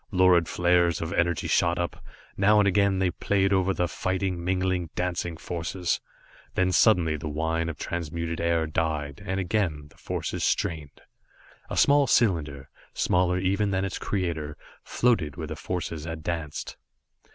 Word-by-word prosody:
Lurid 90 -4 +4
flares 85 -1 +2
of 80 +2 -4
energy 85 -2 +1
shot 85 0 +2
up, 85 0 -3 0.3
now 105 +2 +4
and 105 -1 +4
again 100 0 +3
they 95 -1 +1
played 100 +1 +1
over 95 0 +2
the 90 -2 0
fighting, 95 0 -2
mingling, 90 -1 0
dancing 90 -2 -2
forces. 85 +1 -2 0.5
Then 95 0 +2
suddenly 90 -7 +4
the 75 +1 -5
whine 80 +2 -1
of 80 - -5
transmuted 85 0 -3
air 85 -1 +1
died, 75 -2 -2
and 95 -1 -2
again 85 -6 -1
the - - -23
forces - - -4
strained. 75 -4 -1 0.7
A - - -4
small 145 -1 +5
cylinder, 75 - +1 0.3
smaller 90 0 +2
even 100 +3 +1
than 95 0 0
its 95 - -4
creator, 80 -7 -3 0.3
floated 110 - +1
where 80 -2 -5
the - - -5
forces 85 -4 -4
had 80 -2 -6
danced. 80 -3 -4
85 Hz, 150 wpm, -26 LUFS, 80-95 Hz, 0.7 s, small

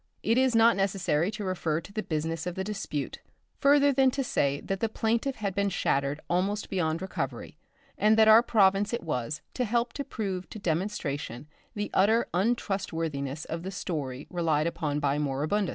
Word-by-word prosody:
It 225 - +2
is 260 -2 +3
not 230 +1 +6
necessary 190 -4 +1
to 210 0 -5
refer 170 -4 -1
to 185 +4 -12
the 215 - -1
business 160 -1 -3
of 180 - -3
the 190 - -2
dispute 195 -8 -4 0.4
further 285 0 +5
than 265 0 +4
to 270 +2 -2
say 140 - 0
that 195 -1 -3
the 225 - 0
plaintiff 230 +5 0
had 200 -3 -3
been 200 +1 +1
shattered 140 -5 0
almost 195 +4 -1
beyond 165 -2 0
recovery, 190 - -4 0.4
and 215 +1 +4
that 220 0 +6
our 220 +1 +9
province 200 -3 +3
it 235 - -2
was 145 -1 -3
to 250 - -1
help 235 +1 0
to 280 - -3
prove 195 -8 -4
to - - -8
demonstration 160 - -3 0.3
the 205 0 -3
utter 220 +5 +4
untrustworthiness 165 - -1
of 165 +1 -4
the 185 - -5
story 145 -8 -4
relied 160 -4 +1
upon 160 -3 -1
by 145 0 +1
Moribundus. 150 +8 0
190 Hz, 180 wpm, -28 LUFS, 155-220 Hz, 0.4 s, our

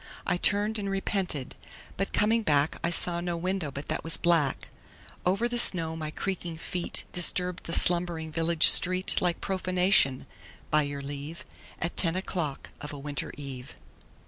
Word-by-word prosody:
I - - -1
turned 210 +4 0
and 200 -1 -5
repented, 195 -8 -3 0.4
but 195 - -4
coming 225 +2 0
back 145 -6 -1
I 170 - -1
saw 170 0 +4
no 175 -1 -5
window 180 -2 -4
but 140 +1 -9
that - - -4
was 165 0 0
black. 165 -5 -1 0.6
Over 200 +6 -1
the 240 0 -2
snow 165 -7 +5
my 155 -1 -7
creaking 175 0 -6
feet 175 +1 -2
Disturbed 180 0 +4
the 165 - -6
slumbering 170 -3 +1
village 165 0 +3
street 185 +1 +6
Like 175 -2 -2
profanation, 185 -7 0 0.5
by 150 - +2
your 145 -1 -6
leave, 145 +4 -9 0.3
At 175 - -6
ten 165 -1 +2
o'clock 175 -6 -6
of 145 - -8
a - - -9
winter 145 -1 -6
eve. 135 -3 -10
170 Hz, 160 wpm, -26 LUFS, 150-185 Hz, 0.6 s, street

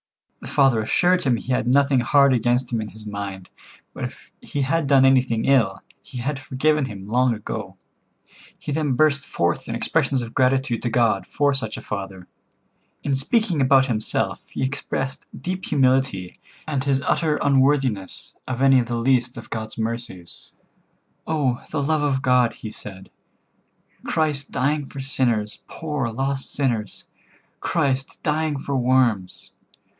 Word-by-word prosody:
The - - -9
father 135 -5 +3
assured 180 +11 +2
him 130 -3 +2
he 130 - -5
had 125 -1 0
nothing 135 +1 +4
hard 140 +3 +4
against 120 +1 +1
him 115 - +1
in 110 - -5
his 110 +3 -11
mind, 100 -3 -6 0.4
but - - -4
if - - -10
he 145 - -2
had 155 +2 0
done 135 -1 +5
anything 130 -4 +3
ill, 115 -8 +2 0.2
he 130 - -10
had 135 +3 -2
forgiven 140 +3 +1
him 100 -5 -8
long 125 +2 +2
ago. 105 - -6 0.8
He - - -6
then 145 -2 0
burst 140 +1 +2
forth 85 0 -1
in - - -2
expressions 130 -3 0
of 115 - -8
gratitude 130 -2 +1
to 120 - -1
God 115 -4 +1
for 145 -1 +1
such 110 -5 +2
a - - -7
father. 95 -3 -6 0.8
In 140 - 0
speaking 175 - +1
about 135 0 +5
himself 110 -5 -1
he - - -4
expressed 135 0 -3
deep 185 +1 -4
humility, 130 -9 +1 0.3
and 140 -4 -1
his 135 -1 +1
utter 155 +2 +1
unworthiness 135 -8 +1
of 130 0 -2
any 135 -1 +6
of 120 - -1
the 120 -1 -2
least 125 0 +1
of 120 - -10
God's 110 -1 -5
mercies. 110 -6 -5 0.7
"Oh, 140 -6 0
the 145 -2 -1
love 155 +1 +1
of 135 -2 0
God," 125 -2 +3
he 110 - -8
said, 95 -3 -9 1.0
"Christ 150 -3 0
dying 140 +2 0
for 140 - -9
sinners, 120 -6 +2
poor 150 -6 -3
lost 135 +4 -3
sinners, 120 -7 -2 0.6
Christ 135 -5 -1
dying 155 -1 0
for 140 0 -3
worms! 125 -7 +1
130 Hz, 155 wpm, -23 LUFS, 115-140 Hz, 1.0 s, any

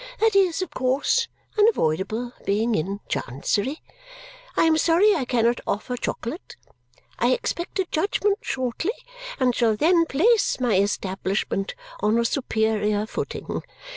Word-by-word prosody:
That 445 -2 +2
is, 375 -2 +3
of 345 - -8
course, 275 - +1 0.3
unavoidable, 225 - +1
being 220 +4 +1
in 195 +4 -2
Chancery. 205 - -2 0.7
I - - +5
am 325 -1 +4
sorry 345 +6 +4
I 285 -9 -1
cannot 240 -1 +1
offer 215 +5 -2
chocolate. 245 +5 -5 0.6
I - - +3
expect 355 -8 -3
a 380 - +1
judgment 400 +4 +1
shortly 260 - -2 0.5
and 255 -2 +3
shall 225 -2 +2
then 330 +7 +3
place 410 - +2
my 245 -3 +1
establishment 195 - -1 0.2
on 215 +2 +2
a 235 - +2
superior 220 -4 0
footing. - - -4
250 Hz, 130 wpm, -24 LUFS, 215-340 Hz, 0.7 s, I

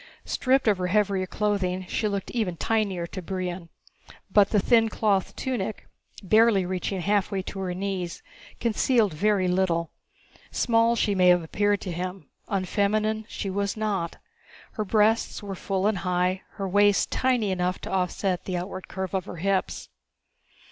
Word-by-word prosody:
Stripped 260 -1 +1
of 205 -3 +3
her 180 - 0
heavier 195 -1 +1
clothing, 190 -2 -1
she 215 - -1
looked 200 -2 -3
even 205 -8 -1
tinier 200 -4 0
to 185 +2 -7
Brion. 180 -1 -4 0.6
But 205 -2 +6
the 210 - +3
thin 225 +2 +4
cloth 205 -3 0
tunic 235 -5 -3 0.4
reaching - - -12
barely 195 -3 +2
halfway 200 -1 +1
to 195 - -7
her 185 -2 -3
knees 185 -2 -4 0.4
concealed 230 -3 +2
very 195 +3 +2
little. 180 -2 +1 0.6
Small 230 0 +2
she 210 -2 +1
may 185 -2 +4
have 180 -1 +5
appeared 205 +5 0
to 185 - -4
him: 180 +2 -5 0.2
unfeminine 215 +3 0
she 195 - -4
was 200 +2 -1
not. 200 -6 -1 0.6
Her 215 - -3
breasts 215 +2 +2
were 200 -1 -5
full 190 +1 -2
and 210 -3 +1
high, 180 +1 0
her 195 -2 -4
waist 205 +1 +3
tiny 245 -6 +1
enough 180 0 0
to - - -6
offset 185 0 -1
the 185 -2 -2
outward 185 +1 -6
curve 190 -1 -5
of 190 -2 -1
her - - -7
hips. 195 +2 -1
195 Hz, 155 wpm, -26 LUFS, 185-210 Hz, 0.6 s, But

